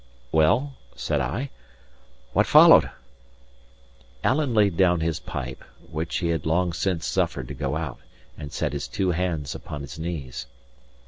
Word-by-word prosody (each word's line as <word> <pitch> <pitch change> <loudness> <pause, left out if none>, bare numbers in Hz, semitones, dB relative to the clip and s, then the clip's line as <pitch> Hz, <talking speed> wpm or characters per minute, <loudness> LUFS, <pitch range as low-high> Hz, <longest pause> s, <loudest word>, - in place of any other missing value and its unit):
'" - - -32
"Well," 125 - +3 0.2
said 75 - -1
I, 100 - -3 0.8
"what - - +3
followed?" - - +8 1.3
Alan 135 -3 +1
laid 100 -4 +4
down 90 -2 +3
his 80 -1 -1
pipe, 65 -1 -6 0.3
which 80 +1 -3
he 85 -2 -1
had 80 -3 -1
long 85 +2 +1
since 85 -1 -1
suffered 65 - -1
to - - -4
go 70 +1 -2
out, 80 -4 -4 0.4
and 75 -1 -8
set 70 - -2
his 70 +1 -3
two 95 -2 0
hands 85 -5 -2
upon 75 - -7
his 70 +2 -8
knees. 75 -8 -5
80 Hz, 150 wpm, -25 LUFS, 70-90 Hz, 1.3 s, followed